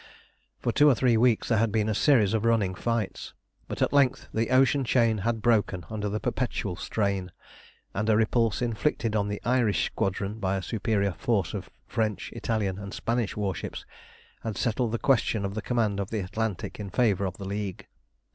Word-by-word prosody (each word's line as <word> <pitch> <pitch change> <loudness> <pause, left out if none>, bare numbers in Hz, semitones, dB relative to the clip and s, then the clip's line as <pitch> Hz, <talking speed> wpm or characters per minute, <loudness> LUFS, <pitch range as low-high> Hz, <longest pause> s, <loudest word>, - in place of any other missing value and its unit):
For 120 - -1
two 145 +5 +5
or 135 - +5
three 120 -1 +3
weeks 115 0 +3
there 115 -3 +3
had 115 -1 +2
been 110 0 +1
a 110 - +1
series 110 -4 +4
of 110 -1 +1
running 115 -5 +2
fights; 115 +2 -3 0.3
but - - -1
at - - 0
length 135 -2 +2
the 115 +1 0
ocean 135 +2 +4
chain 115 -3 +2
had 115 +2 -1
broken 100 -6 +2
under 105 -1 -2
the 105 +2 -2
perpetual 105 -7 -2
strain, 100 -2 -2 0.6
and 105 +2 -1
a 110 - +5
repulse 115 0 +2
inflicted 115 -1 0
on 100 -1 +1
the 105 0 -3
Irish 120 -4 +2
Squadron 100 +3 -2
by 95 -1 0
a 95 - -4
superior 100 -1 0
force 100 -9 0
of - - -5 0.2
French, 110 -2 -2
Italian, 100 -4 -1
and 100 +1 -7
Spanish 115 -3 -1
warships 100 -4 -3 0.6
had 110 -4 -4
settled 120 0 0
the 115 - 0
question 115 -5 +2
of 100 - -3
the 110 - -3
command 110 -4 0
of 100 - -3
the 110 -2 -2
Atlantic 100 +1 -3
in 100 -2 -5
favour 100 -2 +2
of 95 -1 -4
the 100 - -7
League. 100 -1 -4
110 Hz, 190 wpm, -27 LUFS, 100-115 Hz, 0.6 s, two